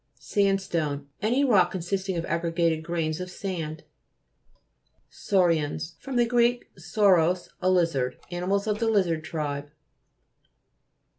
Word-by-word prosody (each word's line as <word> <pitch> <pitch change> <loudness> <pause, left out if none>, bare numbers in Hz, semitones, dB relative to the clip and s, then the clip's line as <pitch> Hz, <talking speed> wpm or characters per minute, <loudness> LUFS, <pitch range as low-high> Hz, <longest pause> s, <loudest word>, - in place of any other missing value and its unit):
SANDSTONE 170 -8 -1
Any 245 +7 +2
rock 195 -9 +4
consisting 190 +1 -2
of 165 - -2
aggregated 165 -1 0
grains 160 -1 -2
of 180 0 -5
sand. 165 -5 -5 1.3
SAU'RIANS 165 -4 0
fr. 270 - -7
gr. 240 0 +3 0.2
sauros, 180 -1 +2
a 185 - +2
lizard. 165 -9 +1
Animals 185 +3 -1
of 210 -1 -1
the 230 - 0
lizard 180 -7 +1
tribe. 145 -3 -4
175 Hz, 105 wpm, -26 LUFS, 160-195 Hz, 1.3 s, rock